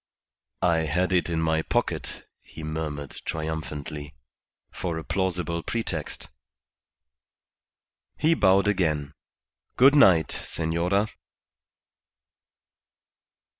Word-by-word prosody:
"I 85 -2 +4
had 80 +4 0
it 90 -1 +2
in 85 -1 0
my 80 0 +2
pocket," - - -2
he 80 - -11
murmured, 75 -2 -5
triumphantly, 75 -2 -5 0.6
"for 85 -2 -3
a 80 - -5
plausible 90 -3 -1
pretext." 85 -8 -4 1.9
He 160 +2 +3
bowed 95 -8 +4
again. 80 -8 0 0.6
"Good 135 +3 +7
night, 95 - +6
senora." 85 +6 -1
85 Hz, 85 wpm, -26 LUFS, 80-95 Hz, 1.9 s, Good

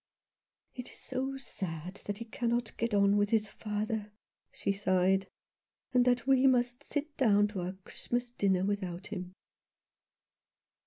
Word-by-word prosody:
" - - -57
It 250 -1 -7
is - - -13
so 265 +1 -3
sad 180 - -5
that 205 0 -3
he 230 - -6
cannot 235 0 -1
get 230 -1 0
on 200 0 +5
with 205 0 +3
his 215 -1 +2
father," 210 +1 -3 0.4
she - - -1
sighed, 190 -1 +2 0.7
"and 250 -1 +5
that 245 -1 +3
we 270 0 +5
must 245 0 +2
sit 295 +1 -3
down 205 -5 +5
to 200 -3 -4
our 180 +1 -3
Christmas 240 0 -3
dinner 190 -5 +2
without 190 -2 -2
him." 180 -2 -5
210 Hz, 150 wpm, -32 LUFS, 195-245 Hz, 0.7 s, on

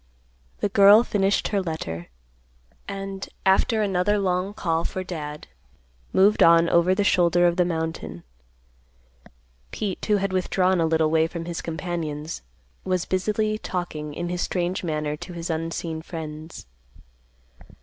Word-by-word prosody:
The 205 - +1
girl 200 +3 +7
finished 200 -3 +1
her 200 -2 +1
letter, 85 - -5 0.8
and, 195 -1 -5 0.2
after 215 +3 +3
another 195 +1 +1
long 185 0 0
call 170 -5 -1
for 185 - -3
Dad, 150 -4 -6 0.7
moved 200 +3 +4
on 165 0 +6
over 170 +2 +3
the 205 - +1
shoulder 175 -2 +3
of 175 -1 +3
the 180 -1 +3
mountain. 160 - -4 1.5
Pete, 195 - -4
who 210 - +4
had 195 -1 -2
withdrawn 185 -1 +2
a 165 - +2
little 160 -1 +2
way 160 0 +3
from 165 0 -6
his 170 -1 -4
companions, 160 -2 -4 0.4
was 185 -2 -1
busily 215 +3 0
talking 155 -7 -4
in 175 0 -3
his 180 0 -2
strange 180 0 -1
manner 150 -3 -2
to 175 +3 -9
his 170 0 -4
unseen 165 0 -3
friends. 160 -1 -8
175 Hz, 140 wpm, -24 LUFS, 160-190 Hz, 1.5 s, girl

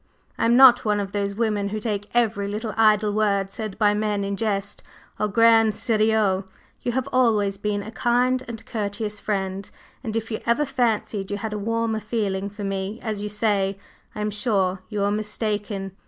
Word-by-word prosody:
I - - 0
am 235 +1 +4
not 255 -2 +8
one 210 -1 +1
of 195 -1 -3
those 200 0 -2
women 210 -3 0
who 215 +1 -3
take 205 -2 -3
every 220 -4 +1
little 215 +2 -4
idle 215 -1 +4
word 200 -2 +1
said 215 -1 -6
by 210 -2 +3
men 210 -1 -1
in 200 0 -2
jest 200 -2 -2 0.4
au 210 - +1
grand 225 +1 +5
serieux! 215 -4 +2 0.4
You 240 - -2
have 260 +1 -1
always 215 -6 +2
been 205 0 -2
a 220 - -8
kind 245 +2 +1
and 225 -1 -7
courteous 210 -2 -3
friend, 195 -2 -3 0.3
and 220 -3 -4
if 225 0 -3
you 220 - -2
ever 235 +6 +2
fancied 225 -7 -1
you 205 - -2
had 215 +1 -4
a 210 - -3
warmer 230 +1 -1
feeling 205 -3 -2
for 205 +1 -8
me, 195 +2 -3
as 215 -3 -3
you 210 - -3
say, 205 -2 0 0.4
I 210 - -4
am 210 0 -1
sure 200 -3 0
you 210 -2 -2
were 200 0 +2
mistaken. 210 -2 -2
210 Hz, 190 wpm, -24 LUFS, 200-225 Hz, 0.4 s, not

